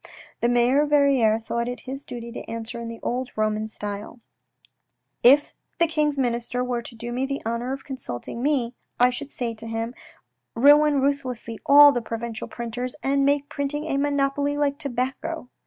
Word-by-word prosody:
The 235 Hz, -, +2 dB
mayor 245 Hz, +3 st, +4 dB
of 295 Hz, -, 0 dB
Verrieres 265 Hz, -7 st, +4 dB
thought 235 Hz, +1 st, -2 dB
it 245 Hz, 0 st, -5 dB
his 270 Hz, +2 st, -7 dB
duty 235 Hz, -3 st, -7 dB
to -, -, -6 dB
answer 230 Hz, +1 st, -5 dB
in 235 Hz, -, -5 dB
the 230 Hz, 0 st, -7 dB
old 250 Hz, +1 st, -2 dB
Roman 215 Hz, 0 st, 0 dB
style: 210 Hz, +2 st, -7 dB, 0.5 s
" -, -, -52 dB
If 295 Hz, -, -18 dB, 0.2 s
the 340 Hz, -, +4 dB
King's 300 Hz, -3 st, 0 dB
Minister 245 Hz, -1 st, -1 dB
were 245 Hz, -1 st, -2 dB
to 235 Hz, -, -11 dB
do 235 Hz, +1 st, -6 dB
me 255 Hz, +2 st, -1 dB
the 275 Hz, 0 st, -2 dB
honour 235 Hz, +3 st, -2 dB
of 270 Hz, 0 st, -5 dB
consulting 235 Hz, -, -6 dB
me, 260 Hz, -4 st, +1 dB, 0.3 s
I 250 Hz, +1 st, +5 dB
should 275 Hz, +3 st, -6 dB
say 240 Hz, -5 st, -3 dB
to 225 Hz, +1 st, -10 dB
him, 225 Hz, +1 st, -3 dB, 0.6 s
ruin 290 Hz, +3 st, +6 dB
ruthlessly 255 Hz, -5 st, -2 dB
all 290 Hz, +1 st, +9 dB
the 245 Hz, -3 st, -1 dB
provincial 230 Hz, 0 st, -5 dB
printers, 245 Hz, +2 st, -5 dB
and 275 Hz, +1 st, +2 dB
make 285 Hz, 0 st, +2 dB
printing 290 Hz, +1 st, -3 dB
a 275 Hz, -, -1 dB
monopoly 285 Hz, 0 st, 0 dB
like 285 Hz, -1 st, 0 dB
tobacco." 265 Hz, +2 st, -3 dB
250 Hz, 180 wpm, -24 LUFS, 235-280 Hz, 0.6 s, all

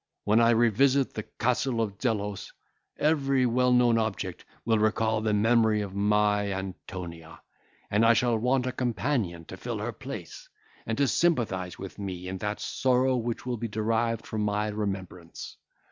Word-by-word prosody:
When 105 Hz, +2 st, +3 dB
I 115 Hz, 0 st, +5 dB
revisit 120 Hz, +4 st, +3 dB
the 110 Hz, -, -3 dB
Castle 125 Hz, +2 st, -1 dB
of 105 Hz, -3 st, -2 dB
Zelos, 105 Hz, -5 st, -2 dB, 0.5 s
every 140 Hz, -4 st, +2 dB
well 125 Hz, +1 st, +2 dB
known 120 Hz, -2 st, +4 dB
object 100 Hz, -5 st, -3 dB, 0.2 s
will 115 Hz, -2 st, +3 dB
recall 110 Hz, 0 st, +1 dB
the 110 Hz, -1 st, 0 dB
memory 110 Hz, 0 st, +3 dB
of 100 Hz, -2 st, -5 dB
my 105 Hz, 0 st, +2 dB
Antonia, 90 Hz, -3 st, -7 dB, 0.5 s
and 105 Hz, +2 st, +3 dB
I 115 Hz, +1 st, +6 dB
shall 120 Hz, -1 st, +2 dB
want 125 Hz, +3 st, +1 dB
a 130 Hz, -, -1 dB
companion 120 Hz, -, -1 dB
to -, -, -9 dB
fill -, -, -4 dB
her -, -, -3 dB
place, -, -, -9 dB, 0.4 s
and 115 Hz, -, -1 dB
to 140 Hz, -1 st, +3 dB
sympathise 110 Hz, -, 0 dB
with 95 Hz, +1 st, -9 dB
me 90 Hz, -2 st, -5 dB
in 95 Hz, 0 st, -5 dB
that 105 Hz, +1 st, -3 dB
sorrow 130 Hz, 0 st, +1 dB
which 120 Hz, -1 st, -3 dB
will 125 Hz, -1 st, -2 dB
be 115 Hz, +1 st, -3 dB
derived 115 Hz, +1 st, -1 dB
from 110 Hz, -, -3 dB
my 105 Hz, 0 st, 0 dB
remembrance. 95 Hz, -5 st, -5 dB
110 Hz, 160 wpm, -27 LUFS, 100-120 Hz, 0.5 s, I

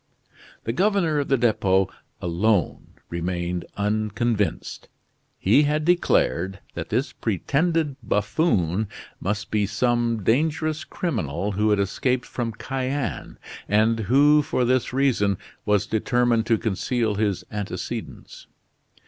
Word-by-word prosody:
The 115 Hz, -, -2 dB
governor 180 Hz, -, +2 dB
of 140 Hz, -, -1 dB
the 135 Hz, -, +3 dB
Depot 95 Hz, -5 st, +2 dB, 0.4 s
alone 90 Hz, +1 st, 0 dB, 0.2 s
remained 85 Hz, +1 st, -2 dB
unconvinced. 105 Hz, +1 st, -1 dB, 0.5 s
He 110 Hz, +9 st, +4 dB
had 150 Hz, +1 st, +1 dB
declared 95 Hz, -, +2 dB, 0.2 s
that 85 Hz, -1 st, -5 dB
this 125 Hz, +8 st, -1 dB
pretended 145 Hz, -, 0 dB
buffoon 105 Hz, -, +1 dB, 0.3 s
must 105 Hz, +3 st, -3 dB
be 105 Hz, -2 st, +1 dB
some 115 Hz, 0 st, 0 dB
dangerous 155 Hz, -, +1 dB
criminal 100 Hz, -, -2 dB
who 105 Hz, +2 st, +1 dB
had 105 Hz, -, +3 dB
escaped 125 Hz, +6 st, 0 dB
from 120 Hz, -2 st, -3 dB
Cayenne, 135 Hz, +2 st, -3 dB, 0.3 s
and 110 Hz, +2 st, +3 dB
who 140 Hz, +8 st, +5 dB
for 125 Hz, -3 st, 0 dB
this 130 Hz, 0 st, +1 dB
reason 125 Hz, -7 st, +2 dB, 0.3 s
was 105 Hz, -2 st, +3 dB
determined 115 Hz, 0 st, +1 dB
to 115 Hz, -, +3 dB
conceal 110 Hz, +1 st, -1 dB
his 100 Hz, -2 st, -1 dB
antecedents. 105 Hz, -2 st, -6 dB
110 Hz, 115 wpm, -24 LUFS, 100-135 Hz, 0.5 s, who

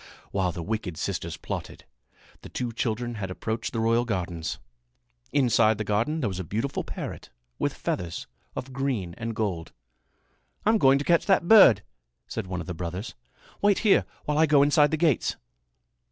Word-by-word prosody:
While 95 Hz, -2 st, 0 dB
the 85 Hz, 0 st, -6 dB
wicked 100 Hz, -4 st, -3 dB
sisters 85 Hz, -2 st, -3 dB
plotted, -, -, -6 dB, 0.6 s
the -, -, -10 dB
two 125 Hz, -2 st, -3 dB
children 120 Hz, +1 st, -2 dB
had 95 Hz, -, -3 dB
approached 110 Hz, +4 st, -3 dB
the 115 Hz, -, -2 dB
royal 115 Hz, +1 st, +3 dB
gardens. 90 Hz, -7 st, -3 dB, 0.7 s
Inside 115 Hz, -5 st, +3 dB
the 110 Hz, -, -2 dB
garden 115 Hz, +10 st, 0 dB
there 120 Hz, -, +1 dB
was 95 Hz, -2 st, -4 dB
a -, -, -2 dB
beautiful 115 Hz, -, -2 dB
parrot -, -, -7 dB, 0.3 s
with -, -, 0 dB
feathers 85 Hz, -2 st, -3 dB, 0.3 s
of 130 Hz, +1 st, -6 dB
green 125 Hz, -10 st, -2 dB
and 115 Hz, -1 st, -3 dB
gold. 95 Hz, -7 st, -3 dB, 0.9 s
"I'm 220 Hz, +1 st, +4 dB
going 135 Hz, -3 st, +6 dB
to 140 Hz, -, -3 dB
catch 170 Hz, -1 st, +3 dB
that 190 Hz, -3 st, +3 dB
bird," 150 Hz, -, +8 dB, 0.4 s
said 110 Hz, -4 st, -5 dB
one 90 Hz, -1 st, -3 dB
of -, -, -7 dB
the 90 Hz, -, -4 dB
brothers. 90 Hz, +6 st, -5 dB, 0.5 s
"Wait 205 Hz, -1 st, +4 dB
here 205 Hz, -, +5 dB, 0.2 s
while 150 Hz, 0 st, 0 dB
I 160 Hz, -, +5 dB
go 145 Hz, -2 st, +5 dB
inside 145 Hz, +1 st, +4 dB
the 160 Hz, -, 0 dB
gates." 155 Hz, -6 st, +2 dB
115 Hz, 170 wpm, -26 LUFS, 95-140 Hz, 0.9 s, bird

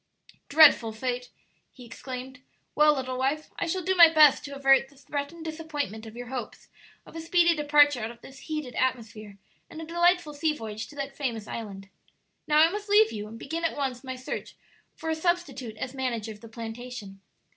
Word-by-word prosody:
"Dreadful 285 Hz, -7 st, +6 dB
fate!" 245 Hz, +2 st, -3 dB, 0.4 s
he 250 Hz, -, -14 dB
exclaimed. 255 Hz, +2 st, -8 dB, 0.3 s
"Well, 300 Hz, 0 st, +5 dB
little 255 Hz, -1 st, -4 dB
wife, 280 Hz, +4 st, -1 dB
I -, -, -1 dB
shall 370 Hz, +2 st, -2 dB
do 375 Hz, +3 st, +1 dB
my 340 Hz, -3 st, +8 dB
best 305 Hz, -3 st, +6 dB
to 280 Hz, -1 st, -7 dB
avert 270 Hz, -1 st, +4 dB
the 280 Hz, -, -22 dB
threatened 285 Hz, +4 st, -6 dB
disappointment 295 Hz, -9 st, -5 dB
of 220 Hz, -, -11 dB
your 245 Hz, 0 st, -8 dB
hopes 250 Hz, -4 st, -7 dB, 0.4 s
of -, -, -15 dB
a 325 Hz, -, -5 dB
speedy 340 Hz, +1 st, +3 dB
departure 290 Hz, -2 st, +4 dB
out 220 Hz, -1 st, -3 dB
of 235 Hz, 0 st, -13 dB
this 270 Hz, 0 st, -13 dB
heated 305 Hz, -5 st, -5 dB
atmosphere 220 Hz, -5 st, -3 dB, 0.3 s
and 320 Hz, -, -9 dB
a 325 Hz, -, -6 dB
delightful 345 Hz, -1 st, +2 dB
sea 305 Hz, +1 st, 0 dB
voyage 220 Hz, -4 st, -6 dB
to 295 Hz, -, -14 dB
that 275 Hz, -1 st, -5 dB
famous 235 Hz, -7 st, -3 dB
island. 195 Hz, -4 st, -7 dB, 0.6 s
Now, 300 Hz, -, +3 dB
I 320 Hz, +2 st, +6 dB
must 415 Hz, +1 st, -6 dB
leave 425 Hz, +1 st, +5 dB
you 210 Hz, -1 st, -6 dB
and 225 Hz, +2 st, -10 dB
begin 325 Hz, +8 st, -5 dB
at 330 Hz, -, -1 dB
once 265 Hz, -3 st, -3 dB
my 260 Hz, -1 st, -5 dB
search 255 Hz, 0 st, -6 dB, 0.4 s
for 320 Hz, -, -4 dB
a -, -, 0 dB
substitute 300 Hz, -9 st, -2 dB
as 255 Hz, +3 st, -5 dB
manager 240 Hz, -5 st, -3 dB
of 210 Hz, -1 st, -12 dB
the 230 Hz, -, -12 dB
plantation." 225 Hz, -3 st, -8 dB
270 Hz, 195 wpm, -27 LUFS, 235-315 Hz, 0.6 s, my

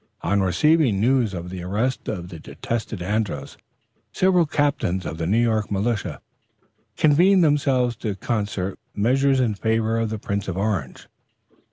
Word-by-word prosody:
On 100 Hz, +2 st, +1 dB
receiving 120 Hz, -, +3 dB
news 120 Hz, -1 st, +2 dB
of 90 Hz, 0 st, -6 dB
the 95 Hz, -1 st, -6 dB
arrest 105 Hz, +9 st, -2 dB
of 90 Hz, -4 st, -4 dB
the 85 Hz, -, -9 dB
detested 110 Hz, +2 st, -5 dB
Andros, 105 Hz, +2 st, -2 dB, 0.6 s
several 180 Hz, -3 st, +3 dB
captains 140 Hz, -, 0 dB
of 80 Hz, -, -5 dB
the 80 Hz, -, -1 dB
New 105 Hz, +5 st, +2 dB
York 110 Hz, -3 st, +1 dB
militia 100 Hz, -, -2 dB, 0.8 s
convened 175 Hz, +5 st, +5 dB
themselves 135 Hz, -5 st, +2 dB
to 105 Hz, -3 st, -3 dB
concert 100 Hz, -3 st, -3 dB, 0.2 s
measures 135 Hz, +5 st, +2 dB
in 120 Hz, -4 st, +1 dB
favor 110 Hz, +2 st, 0 dB
of 115 Hz, -1 st, -1 dB
the 110 Hz, -, -3 dB
Prince 100 Hz, -1 st, -3 dB
of 95 Hz, -1 st, -3 dB
Orange. 95 Hz, -10 st, -2 dB
110 Hz, 150 wpm, -23 LUFS, 95-130 Hz, 0.8 s, convened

